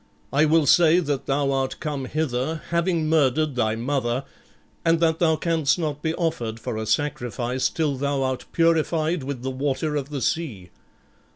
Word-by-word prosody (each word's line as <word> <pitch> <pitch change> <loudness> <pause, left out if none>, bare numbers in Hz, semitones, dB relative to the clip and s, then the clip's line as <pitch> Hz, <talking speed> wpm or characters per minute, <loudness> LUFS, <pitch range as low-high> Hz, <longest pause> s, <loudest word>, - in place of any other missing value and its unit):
I 145 +3 +4
will 155 0 +3
say 170 +4 +5
that 145 -6 -2
thou 140 0 +1
art 135 -1 -1
come 145 -4 -3
hither, 150 +1 -2
having 170 -2 +1
murdered 155 -1 +2
thy 110 -3 +1
mother, 125 +1 -1 0.6
and 165 -1 +3
that 165 -1 +2
thou 160 -2 +3
canst 160 -2 +1
not 150 -4 -3
be 160 +1 -1
offered 120 -10 -2
for 115 - -4
a 110 0 -4
sacrifice 125 -3 -1
till 155 -4 -1
thou 140 0 0
art 130 -1 -2
purified 165 0 +2
with 130 -2 -5
the 130 - -2
water 140 +3 -1
of 140 -1 -2
the 140 -4 -3
sea. 110 - -2
145 Hz, 170 wpm, -24 LUFS, 130-160 Hz, 0.6 s, say